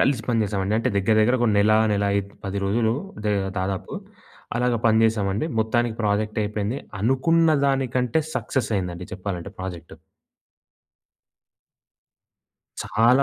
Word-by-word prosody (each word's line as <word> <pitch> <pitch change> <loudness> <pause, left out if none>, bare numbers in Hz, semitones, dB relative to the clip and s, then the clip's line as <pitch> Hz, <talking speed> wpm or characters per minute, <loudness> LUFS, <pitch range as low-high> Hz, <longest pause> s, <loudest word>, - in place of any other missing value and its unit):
కలిసి 130 -5 +2
పని 115 -2 +1
జేసామండి. 100 0 -1
అంటే, 125 - 0
దెగ్గర, 100 +3 +2
దెగ్గర 125 +4 +3
ఒక 120 - +3
నెల, 105 +1 +4 0.2
నెల 100 0 +1
ఐద్ 100 0 -3
10 100 0 -3
రోజులు 110 +3 +1 0.3
దే 105 - +1 0.3
దాదాపు 95 0 -3 0.6
అలాగా 125 0 +1
పని 110 0 +4
జేశామండి. 105 +3 0
మొత్తానికి 115 +1 0
ప్రాజెక్టయిపోయింది. 105 +2 -1 0.2
అనుకున్న 155 - +3
దానికంటే, 130 0 +1 0.2
సక్సెసయిందండి. 90 -8 -2
చెప్పాలంటే 95 0 -5
ప్రాజెక్టు. 85 -3 -7 2.9
చాలా 125 +5 +3
110 Hz, 115 wpm, -23 LUFS, 100-120 Hz, 2.9 s, నెల